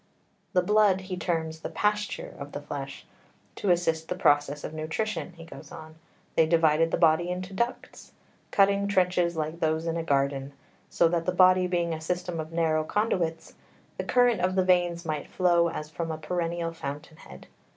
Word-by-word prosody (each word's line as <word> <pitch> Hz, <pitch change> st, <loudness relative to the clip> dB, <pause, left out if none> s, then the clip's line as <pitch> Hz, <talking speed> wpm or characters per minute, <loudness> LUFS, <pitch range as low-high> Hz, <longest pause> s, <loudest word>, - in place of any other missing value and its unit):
The 180 Hz, -2 st, +3 dB
blood 205 Hz, -1 st, +3 dB
he 185 Hz, 0 st, -5 dB
terms 160 Hz, -2 st, -2 dB
the -, -, -5 dB
pasture 210 Hz, -, -1 dB
of -, -, -8 dB
the -, -, -5 dB
flesh. -, -, -7 dB, 0.5 s
"To 200 Hz, -, -1 dB
assist 165 Hz, -2 st, +1 dB
the 180 Hz, -, -2 dB
process 145 Hz, -4 st, +2 dB
of -, -, -6 dB
nutrition," 165 Hz, +5 st, -3 dB
he 165 Hz, -1 st, -12 dB
goes 165 Hz, -, -12 dB
on, 155 Hz, 0 st, -10 dB, 0.4 s
"they 160 Hz, -, +4 dB
divided 165 Hz, -1 st, +3 dB
the -, -, 0 dB
body 170 Hz, +1 st, +3 dB
into 185 Hz, +1 st, -4 dB
ducts, 235 Hz, +5 st, -4 dB, 0.4 s
cutting 200 Hz, 0 st, +3 dB
trenches 180 Hz, -3 st, +1 dB
like 155 Hz, +2 st, -3 dB
those 160 Hz, 0 st, 0 dB
in 165 Hz, 0 st, -1 dB
a 165 Hz, -, -2 dB
garden, 140 Hz, -2 st, 0 dB, 0.4 s
so 170 Hz, -, +3 dB
that, 170 Hz, 0 st, -1 dB
the -, -, +3 dB
body 185 Hz, 0 st, +5 dB
being 175 Hz, -2 st, 0 dB
a 160 Hz, -, -5 dB
system 175 Hz, 0 st, -3 dB
of 155 Hz, 0 st, -5 dB
narrow 160 Hz, -2 st, +1 dB
conduits, 170 Hz, -4 st, -1 dB, 0.4 s
the -, -, -2 dB
current 245 Hz, -5 st, +3 dB
of 185 Hz, +1 st, +1 dB
the 185 Hz, -1 st, +2 dB
veins 175 Hz, -2 st, +2 dB
might 155 Hz, -2 st, -3 dB
flow 175 Hz, -2 st, +3 dB
as 150 Hz, -2 st, -6 dB
from 165 Hz, 0 st, -4 dB
a 160 Hz, -, -4 dB
perennial 170 Hz, +1 st, -2 dB
fountain 155 Hz, 0 st, -7 dB
head. 65 Hz, -, -13 dB
170 Hz, 180 wpm, -27 LUFS, 160-185 Hz, 0.5 s, body